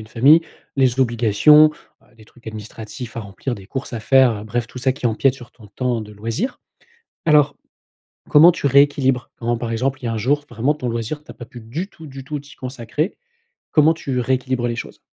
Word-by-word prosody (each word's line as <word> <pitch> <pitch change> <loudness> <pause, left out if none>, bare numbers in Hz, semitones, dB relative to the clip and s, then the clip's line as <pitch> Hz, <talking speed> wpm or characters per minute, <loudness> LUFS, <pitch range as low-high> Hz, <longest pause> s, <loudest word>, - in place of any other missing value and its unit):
une 110 - -12
famille, 140 +9 +5 0.3
les 130 -1 +2
obligations, 125 +6 +5 0.3
bah, 125 - -27
des 110 - -17
trucs 120 +2 -23
administratifs 110 +2 -8
à 115 - -2
remplir, 105 +5 -5
des 95 -4 -12
courses 135 +3 -6
à 115 - -4
faire, 130 +2 +5
heu, 105 - -8
bref 115 +2 -2
tout 125 - -10
ça 130 +1 +1
qui 125 - -3
empiète 125 +4 +2
sur 120 -4 -13
ton 110 - -16
temps 120 +2 -2
de 105 -1 -9
loisir. 115 - -4 0.6
Alors, 150 -2 +4 0.7
comment 160 +4 +8
tu 160 - -6
rééquilibres? 135 -2 +3
Quand 120 0 -1
par 115 0 -4
exemple 130 +4 -1
il - - -7
y - - 0
a 115 - -1
un 110 - -2
jour 145 +7 +1
vraiment 120 +6 0
ton 130 -5 -4
loisir 115 +6 -4
tu - - -12
as - - -11
pas 120 - -10
pu 120 +1 -12
du 140 +12 -5
tout 160 -5 -13
du 135 -1 -9
tout 145 +2 -5
t'y 145 +1 -15
consacrer, 130 - -4 0.6
comment 155 +1 +5
tu 135 -5 -3
rééquilibres 130 -1 -1
les 120 - -3
choses? - - -8
125 Hz, 220 wpm, -20 LUFS, 115-140 Hz, 0.7 s, comment